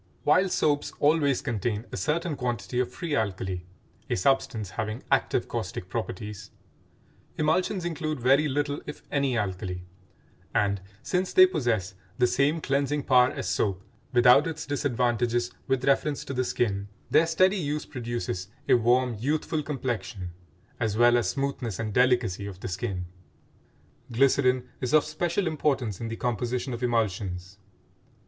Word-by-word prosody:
While 185 +6 +4
soaps 145 -4 +1
always 145 -3 +3
contain 110 0 -2
a - - -4
certain 155 - -1
quantity 120 -3 -2
of 125 -1 0
free 160 +2 -3
alkali, 95 -3 -1 0.5
a - - +1
substance 115 -2 +1
having 110 +2 -4
active - - +2
caustic - - -4
properties, 105 +1 -5 0.9
emulsions 175 +4 +1
include 155 -3 -2
very 135 +5 +4
little 145 +1 -1
if 150 - -8
any 140 -4 +1
alkali, 90 -3 -3 0.7
and, 100 -2 +2 0.2
since 180 +5 -1
they 185 - +9
possess 120 - -1 0.2
the 125 - +4
same 140 +6 +2
cleansing 140 +1 0
power 125 -1 +5
as - - -5
soap 95 0 0 0.3
without 125 +2 +6
its 160 -1 -4
disadvantages 120 -3 0 0.2
with 130 -1 0
reference 140 +1 +1
to 135 - -5
the 130 0 0
skin, 100 -6 -1 0.2
their 165 - +5
steady 185 +5 +3
use 150 -3 -2
produces 120 -7 -4 0.2
a - - +5
warm 125 +1 +3
youthful 150 +4 0
complexion, 120 -10 -4 0.5
as 110 -1 0
well 120 +1 +6
as 120 - +2
smoothness 135 -7 -2
and 110 -2 -3
delicacy 120 -6 +2
of 95 -2 -8
the - - -4
skin. 95 -1 -3 1.1
Glycerin 130 0 +3
is 125 0 -2
of 155 - +5
special 170 +5 -1
importance 135 - -1
in 115 - -3
the 115 - -4
composition 120 +2 -2
of 120 - -5
emulsions. 100 -5 -1
125 Hz, 145 wpm, -27 LUFS, 110-145 Hz, 1.1 s, they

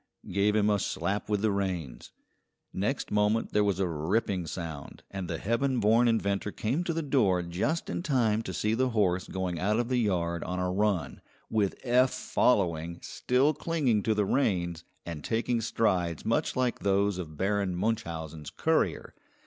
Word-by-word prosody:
gave 100 +3 +2
him 105 -1 +3
a 105 -1 +3
slap 95 +4 -2
with 105 -1 0
the 110 - +3
reins. 95 -9 -3 0.6
Next 105 +9 -2
moment 105 +2 +1
there 105 - +4
was 100 -3 0
a 95 - +1
ripping 90 +3 -1
sound, 80 -4 -7
and 95 -2 -4
the 85 - -2
heaven 120 +6 0
born 115 +3 +4
inventor 105 -3 0
came 130 - -1
to 175 - 0
the 165 0 -2
door 105 -11 +2
just 90 - -1
in - - -3
time 120 -9 +1
to - - -5
see 105 +1 0
the 130 +3 +1
horse 95 -6 +1
going 90 -3 -3
out 105 +5 +1
of 120 0 -1
the 125 -1 +2
yard 85 -6 0
on 90 - -3
a 90 0 0
run, 95 -6 0 0.3
with 105 -3 0
Eph 125 +1 +4
following, 85 -7 +1
still 135 +5 +1
clinging 140 -9 0
to 110 +1 +1
the 105 -1 +2
reins, 90 -9 0 0.2
and 80 -3 -6
taking 115 +1 0
strides 90 -8 0
much - - 0
like 125 -1 0
those 100 -1 +1
of 80 -4 -7
Baron 100 0 0
Munchausen's 80 -7 -3
courier. - - 0
100 Hz, 175 wpm, -29 LUFS, 90-115 Hz, 0.6 s, there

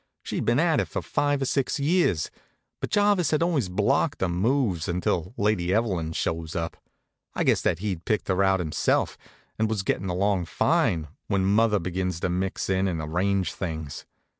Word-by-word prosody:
She'd - - -3
been - - +3
at - - +3
it - - 0
for - - -4
five 145 -1 0
or - - 0
six 135 +1 0
years; 145 - +2 0.5
but - - -3
Jarvis 205 -5 +3
had 155 +1 +2
always 150 - +1
blocked 135 - +1
her 95 - +2
moves, 95 - +1
until 90 +3 -1
Lady 100 -4 +1
Evelyn 95 -7 0
shows 80 0 -2
up. 85 -1 -2 0.6
I - - +1
guessed - - +2
that 85 - +2
he'd 95 -3 -3
picked 110 - 0
her 95 0 +1
out 95 0 +3
himself, 80 -3 0 0.4
and 110 0 +2
was 105 -3 -1
gettin' 95 0 -1
along 95 0 +1
fine, 80 0 +1 0.2
when 100 -2 +1
mother 105 +2 +3
begins 90 -1 -2
to - - 0
mix 90 +2 -2
in 95 0 +1
and 85 -4 -2
arrange 90 +5 0
things. 80 -6 -5
95 Hz, 180 wpm, -26 LUFS, 85-110 Hz, 0.6 s, been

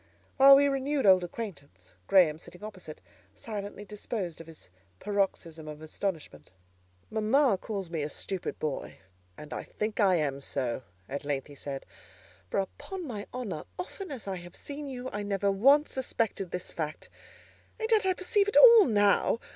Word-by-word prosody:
While 275 0 +10
we 285 +1 +5
renewed 275 0 0
old 185 -2 +6
acquaintance, 150 - -8
Graham, 165 -5 +5
sitting 180 +4 -14
opposite, 185 - -9 0.3
silently 205 - -6
disposed 200 -5 -5
of 165 - -13
his 160 - -13 0.3
paroxysm 185 -6 -2
of 150 0 -7
astonishment. 155 - -5 0.6
"Mamma 220 0 +3
calls 195 -5 -5
me 165 -3 -2
a 145 - -2
stupid 185 +4 -4
boy, 150 -3 -4 0.4
and 150 - -9
I - - -3
think 215 +1 -4
I 195 -4 +5
am 145 -4 -1
so," 130 -3 -2 0.3
at 140 +1 -5
length 140 -2 -2
he 145 - -13
said; 140 -1 -6 0.6
"for, - - 0
upon 360 - -5
my 215 -7 -6
honour, 230 -11 -5
often 370 +1 -6
as 255 -8 -7
I 190 -1 -2
have 175 0 -11
seen 290 0 -6
you, 255 -1 -6
I 205 - -2
never 200 -1 0
once 275 +10 +4
suspected 230 -7 -2
this 180 +1 -5
fact: 155 -1 -5 0.7
and 445 0 -2
yet 440 -2 +5
I 380 -1 +2
perceive 400 +2 +1
it 410 - +1
all 465 -4 +10
now. 205 0 +3
200 Hz, 165 wpm, -29 LUFS, 160-255 Hz, 0.7 s, While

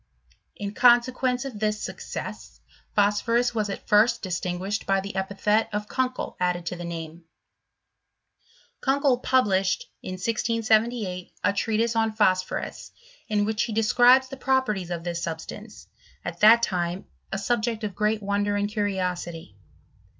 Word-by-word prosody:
In 200 0 -5
consequence 250 +2 +3
of 245 -6 -6
this 210 0 0
success, - - -7 0.4
phosphorus 230 +4 +2
was 215 -3 -1
at 195 - -6
first 225 +3 +4
distinguished 185 +2 -3
by 195 0 +3
the 195 0 -6
epithet 200 +3 +1
of 210 0 -3
Kunkel 255 +1 -2
added 180 -1 0
to 175 - -3
the 175 - -7
name. 165 -1 -7 1.6
Kunkel 270 -2 +2
published, 255 - +1
in 185 - -6
1678, 220 -1 0
a - - +3
treatise 225 +3 0
on 225 -1 +1
phosphorus, 185 -4 0 0.4
in 210 -2 +1
which 215 0 -1
he 230 - -1
describes 245 +4 +5
the 270 - -8
properties 255 -9 0
of 170 -1 -4
this 170 -1 -3
substance, 170 +7 -7 0.4
at - - -5
that 230 +2 +7
time 175 -2 -1 0.3
a - - -1
subject 225 +1 -1
of 205 -2 -3
great 215 +2 0
wonder 205 +1 0
and 205 0 0
curiosity. 180 - -3
210 Hz, 135 wpm, -25 LUFS, 185-235 Hz, 1.6 s, that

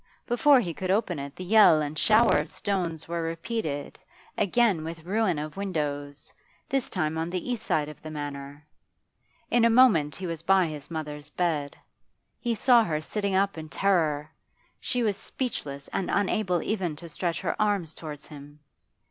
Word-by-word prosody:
Before 275 +3 +5
he 175 -8 -2
could 185 +3 -4
open 190 -5 +1
it 140 0 -7
the 185 - -7
yell 195 -4 +6
and 150 0 -3
the - - -3
shower 220 +2 +5
of 150 +1 -4
stones 170 -6 -2
were 170 0 -2
repeated, 165 -2 -4 0.4
again 205 -4 +2
with 165 0 -7
ruin 195 -3 +1
of 150 +3 -5
windows, 145 -7 -3 0.3
this 270 -2 -1
time 160 -3 -1
on 165 +1 -2
the 185 +7 -3
east 240 -3 -2
side 150 -8 0
of 150 - -11
the 155 - -8
Manor. 145 -1 -7 0.9
In 240 - +4
a 230 - +6
moment 220 - +5
he 190 - -6
was 165 -2 -4
by 190 +1 +4
his 150 -3 -7
mother's 150 -2 -5
bed; 150 -4 -1 0.6
he 235 -2 -1
saw 240 +1 +5
her 155 -6 -1
sitting 200 +4 -2
up 195 -3 +1
in 155 0 -8
terror; 155 -7 +1 0.5
she 245 -1 -1
was 205 -3 +1
speechless 140 - -4
and 190 - -2
unable 195 -2 +1
even 185 -7 -1
to 170 +3 -10
stretch 170 +1 -3
her - - -1
arms 200 -7 +1
towards 150 -3 -8
him. 145 0 -12
170 Hz, 175 wpm, -27 LUFS, 150-205 Hz, 0.9 s, yell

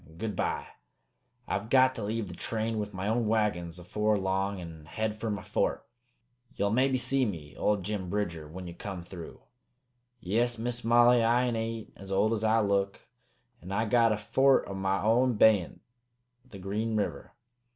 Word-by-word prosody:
Good 110 +3 -3
by. - - -1 0.8
I've 100 +3 -2
got 130 0 +5
to 115 - -5
leave 110 0 -2
the 85 - -8
train 110 +4 -2
with 105 0 -3
my 95 0 -4
own 115 +1 +1
wagons 100 -6 0
afore 105 +4 0
long 95 +1 -1
an' 80 -3 -9
head 110 +7 -3
fer 110 +1 -4
my 105 0 -3
fort. - - -1 0.7
Ye'll 100 +1 0
maybe 130 +3 +3
see 135 +1 +2
me 80 - -4
old 105 +7 0
Jim 100 -2 -3
Bridger 85 -6 -3
when 90 +4 -8
ye 85 - -7
come 90 0 -6
through. 85 -2 -10 0.8
"Yes, 115 +5 0
Miss 120 +1 -3
Molly, 120 +1 +5
I 120 +2 +3
ain't 115 -2 -3
as 95 0 -10
old 110 +3 +2
as 110 -1 -2
I 110 +1 +3
look, 100 -1 0 0.6
and 90 +3 -9
I 110 +3 0
got 115 +1 +4
a 105 - +1
fort 130 +6 +3
o' 100 - -5
my 95 +1 -1
own 120 +3 +3
beyant 105 -5 +3 0.7
the 105 - -10
Green 105 +4 -2
River. 105 - -3
105 Hz, 175 wpm, -29 LUFS, 95-115 Hz, 0.8 s, got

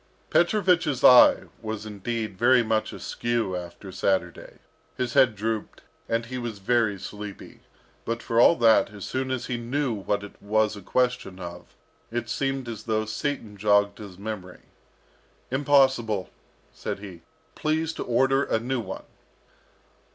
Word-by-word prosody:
Petrovich's 175 - +2
eye 125 -1 +8 0.2
was 110 -1 -5
indeed 110 0 -4
very 120 +4 +4
much 110 -1 0
askew 115 -5 -2
after 90 +2 -8
Saturday. 95 -2 -1 0.4
His 125 -2 -2
head 120 -4 +5
drooped, 110 +1 -4 0.3
and 115 +1 0
he 125 +1 -5
was 120 -3 -5
very 110 0 +1
sleepy; 105 0 -9 0.4
but 115 0 -3
for 115 0 +2
all 170 - +7
that, 115 -6 +4
as 100 -2 -8
soon 130 0 -2
as 130 -2 -2
he 125 - -2
knew 125 +2 -1
what 100 0 -2
it 105 - -12
was 110 +1 +1
a 100 - -9
question 125 -3 -1
of, 90 -1 -9 0.3
it 120 0 -3
seemed 135 -2 -2
as 110 -2 -7
though 110 -1 0
Satan 110 -1 -3
jogged 100 0 +2
his 100 -4 -10
memory. 100 -3 -7 0.9
"Impossible," 130 -7 +2 0.4
said - - -4
he. 95 -4 -10 0.3
"Please 160 +1 -1
to - - -4
order 135 +3 +2
a - - +1
new 125 +2 -2
one." 115 - -6
115 Hz, 145 wpm, -26 LUFS, 100-125 Hz, 0.9 s, eye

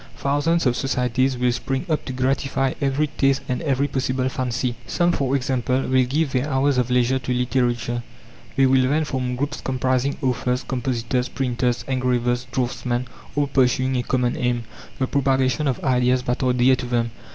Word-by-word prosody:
Thousands 145 +4 +1
of 125 -1 +3
societies 130 0 0
will 125 0 +2
spring 135 +4 -2
up 155 -3 -1
to - - -4
gratify 135 +1 0
every 140 +2 +1
taste 135 -2 +1
and 125 -3 -2
every 140 -3 +1
possible 130 -1 -1
fancy. 125 -1 -2
Some, 175 0 +2
for 135 -4 0
example, 130 -1 0
will 130 -1 +2
give 145 +2 0
their 130 +3 0
hours 135 -1 +2
of 125 -1 0
leisure 125 +1 +2
to 125 0 -4
literature. 120 -1 0 0.5
They 135 - +4
will 130 -1 +4
then 155 +2 +1
form 130 -3 -2
groups 145 +4 -3
comprising 130 +1 0
authors, 125 0 0
compositors, 125 0 -2
printers, 125 -2 -1
engravers, 125 -1 0
draughtsmen, 125 0 -2 0.3
all 145 0 +2
pursuing 130 -1 +2
a 125 - +1
common 125 0 0
aim 120 -1 0 0.3
the 130 - +1
propagation 135 0 +1
of 130 - 0
ideas 125 -1 +2
that 125 0 -1
are 130 -1 +2
dear 125 +1 +4
to 125 - -5
them. 120 -1 0
130 Hz, 175 wpm, -22 LUFS, 125-135 Hz, 0.5 s, They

